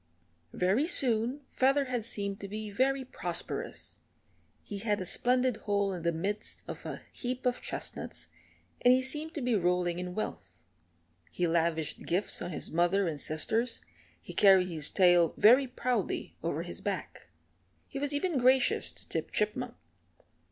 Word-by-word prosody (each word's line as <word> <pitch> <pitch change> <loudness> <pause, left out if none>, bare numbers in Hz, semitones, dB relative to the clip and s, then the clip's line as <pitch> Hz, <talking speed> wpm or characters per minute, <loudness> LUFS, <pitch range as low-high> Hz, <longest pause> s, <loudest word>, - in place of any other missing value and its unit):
Very 200 - +2
soon 250 -3 +3
Featherhead 260 -3 +1
seemed 200 -4 -2
to 200 - -6
be 210 +1 -6
very 265 +4 +1
prosperous. - - -4 0.6
He 205 - -6
had 210 0 0
a 185 - -4
splendid 250 +4 +2
hole 200 -2 0
in 180 - -5
the 170 +1 +1
midst 200 +6 -1
of - - -7
a - - -6
heap 255 0 -4
of 250 0 0
chestnuts, - - -5 0.5
and 245 +1 +6
he 260 - 0
seemed 300 +4 +1
to 295 - -3
be 245 -1 +1
rolling 180 -2 +1
in 180 0 -5
wealth. 95 - -6 0.7
He 175 - -1
lavished 165 -2 0
gifts 185 +4 0
on - - -4
his 165 - -4
mother 175 +3 +2
and 150 -4 -3
sisters; 225 +10 -1 0.4
he - - -10
carried 190 -2 +5
his 155 -4 +2
tail 175 -3 +4
very 255 +6 +6
proudly 250 0 -2
over - - -2
his - - -7
back. - - -5 0.6
He 275 - -6
was 290 0 -1
even 290 0 0
gracious 255 +1 +4
to - - -13
Tip - - -3
Chipmunk. 230 +3 -1
210 Hz, 155 wpm, -30 LUFS, 180-255 Hz, 0.7 s, and